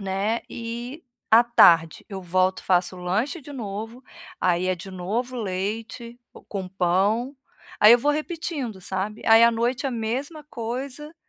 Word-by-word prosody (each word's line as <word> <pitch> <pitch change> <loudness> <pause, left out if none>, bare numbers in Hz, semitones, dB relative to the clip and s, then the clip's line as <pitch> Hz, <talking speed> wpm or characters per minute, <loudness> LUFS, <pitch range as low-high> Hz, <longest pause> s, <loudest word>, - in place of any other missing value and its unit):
né, 200 +4 -1
e 240 +6 -7 0.3
à 230 +2 +7
tarde 165 -9 +5
eu 195 -3 -7
volto 185 +1 0
faço 180 0 +1
lanche 210 - -2
de 290 +2 -10
novo, 225 +1 -6 0.4
aí 180 0 +1
é 185 - +2
de 185 +3 -10
novo 220 +8 -3
leite, 225 +4 -4 0.3
com 195 -2 -4
pão, 195 +8 0 0.4
aí 210 +2 +8
eu 240 - +7
vou 290 +5 +1
repetindo, 305 - -4
sabe, 190 +4 -4
aí 225 +1 +7
à 235 - +7
noite 240 +4 -1
a 270 - -1
mesma 255 +7 -4
coisa, 265 +6 -6
225 Hz, 150 wpm, -24 LUFS, 190-250 Hz, 0.4 s, aí